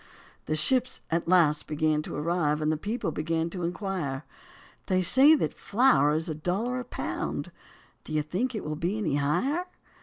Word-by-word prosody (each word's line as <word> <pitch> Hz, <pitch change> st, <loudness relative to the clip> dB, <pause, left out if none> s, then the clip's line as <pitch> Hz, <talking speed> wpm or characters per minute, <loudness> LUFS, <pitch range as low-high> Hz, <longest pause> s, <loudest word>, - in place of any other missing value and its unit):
The 155 Hz, -, 0 dB
ships 255 Hz, -, +1 dB
at 165 Hz, +1 st, 0 dB
last 165 Hz, -4 st, +3 dB
began 155 Hz, 0 st, +1 dB
to -, -, -7 dB
arrive 150 Hz, -1 st, 0 dB
and 155 Hz, 0 st, +1 dB
the -, -, +1 dB
people 205 Hz, +3 st, -3 dB
began 165 Hz, +2 st, -2 dB
to 180 Hz, -, -5 dB
inquire. 170 Hz, -6 st, -3 dB, 0.6 s
They 185 Hz, -2 st, +2 dB
say 275 Hz, -, +7 dB
that -, -, -1 dB
flour 205 Hz, -, +3 dB
is 160 Hz, +2 st, -1 dB
a 160 Hz, -, -2 dB
dollar 195 Hz, +11 st, -2 dB
a -, -, -4 dB
pound, -, -, -4 dB, 0.5 s
do -, -, -10 dB
you 155 Hz, -1 st, +1 dB
think 220 Hz, +11 st, -2 dB
it 215 Hz, -, -4 dB
will 150 Hz, 0 st, -3 dB
be 175 Hz, +7 st, -2 dB
any 165 Hz, -9 st, 0 dB
higher? 210 Hz, -, 0 dB
170 Hz, 180 wpm, -27 LUFS, 155-215 Hz, 0.6 s, say